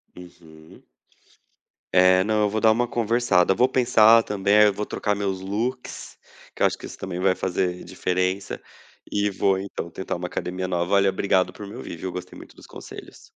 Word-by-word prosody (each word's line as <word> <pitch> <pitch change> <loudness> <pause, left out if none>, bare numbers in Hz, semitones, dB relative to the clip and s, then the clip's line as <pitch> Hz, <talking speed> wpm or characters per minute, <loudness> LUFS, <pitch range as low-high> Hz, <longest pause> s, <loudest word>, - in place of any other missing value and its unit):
Uhum. 80 -3 -15 1.1
É, 90 0 +5
não, 110 0 +1
eu 105 - +2
vou 110 +1 -2
dar 110 0 +5
uma 120 +2 +1
conversada. 115 -6 +2
Vou 125 - +4
pensar 115 -3 +5
também. 105 +1 +2
Eu 105 -1 +4
vou 105 +1 -4
trocar 105 - -2
meus 100 -2 -2
looks, 115 +7 -5 0.4
que - - -12
eu - - +5
acho - - -4
que - - -10
isso - - -10
também 90 -1 -6
vai 95 0 +3
fazer 90 -1 -2
diferença, 95 +2 -2 0.5
e 105 0 0
vou 95 -1 +1
então 95 -3 -6
tentar 95 - -5
uma 90 +1 -4
academia 90 +1 -4
nova. 85 -1 -1
Valeu, 100 -1 +4
obrigado 95 -1 +1
por 105 - -9
me 100 - -10
ouvir, - - -7
viu. 90 +2 -6
Gostei 90 0 -8
muito - - -14
dos - - -16
conselhos. - - -11
95 Hz, 190 wpm, -23 LUFS, 90-105 Hz, 1.1 s, É